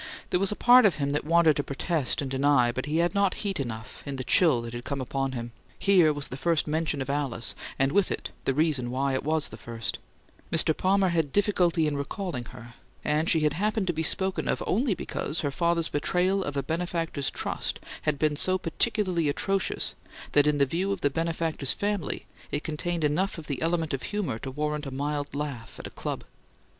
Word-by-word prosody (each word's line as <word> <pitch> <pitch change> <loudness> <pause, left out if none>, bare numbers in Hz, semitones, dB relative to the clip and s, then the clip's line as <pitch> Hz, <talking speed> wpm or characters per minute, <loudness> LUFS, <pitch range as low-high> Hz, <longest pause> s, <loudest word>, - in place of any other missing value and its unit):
There 180 - +3
was 195 +1 +1
a - - -1
part 245 -1 +7
of 190 - 0
him 140 -2 -1
that 150 - -1
wanted 165 -1 +5
to 145 - 0
protest 145 0 -1
and 135 - -4
deny, 135 -3 +3
but 130 +3 -4
he 155 +2 0
had 170 +1 +2
not 200 -1 +2
heat 195 -4 -1
enough, 120 -2 -5
in 140 -1 -5
the 130 - -3
chill 155 -3 +4
that 115 0 -6
had 120 0 -5
come 140 +2 -3
upon 135 +1 -2
him. 120 -1 -5 0.3
Here 180 -6 +5
was 145 -1 -3
the 130 - -6
first 160 +3 +2
"mention" 155 -2 0
of 135 - -10
Alice, 140 -5 -1 0.2
and 135 +1 +2
with 200 +3 +2
it - - -4
the 135 - +2
reason 150 -5 +1
why 135 +2 0
it 130 - -1
was 155 +1 +1
the 110 - -9
first: 115 -1 -4 0.5
Mr. 160 -1 +3
Palmer 190 0 +3
had 165 -5 0
difficulty 180 -5 +2
in 150 -1 0
recalling 140 - -4
her, 120 -1 -11 0.3
and 155 +2 +2
she 160 - +4
happened 200 +7 +1
to 175 - 0
be 160 - -2
spoken 190 +4 0
of, - - 0
only 225 0 +1
because 155 -2 -3
her 145 - -1
father's 170 +1 +1
betrayal 180 +6 +1
of 145 -3 -4
a 140 - 0
benefactor's 165 -2 -2
trust - - -3 0.2
had 150 -2 0
been 155 0 +1
so 185 +5 +3
peculiarly 185 -2 0
atrocious 195 +6 0 0.4
that, 145 0 +4
in 150 -1 +3
the 140 - +4
view 180 +8 -1
of 200 -2 -2
the 145 - +2
benefactor's 165 -2 0
family, 205 -5 -2 0.2
it 145 - -2
contained 165 +2 -2
enough 175 +7 +1
of 160 - -8
the 140 -4 -3
element 165 -2 0
of 135 - -2
humour 180 - -2
to 135 - -5
warrant 150 +1 -2
a - - -3
mild 145 +1 -3
laugh 140 -6 -5
at - - -8
a - - -7
club. - - -4
150 Hz, 215 wpm, -27 LUFS, 140-175 Hz, 0.5 s, part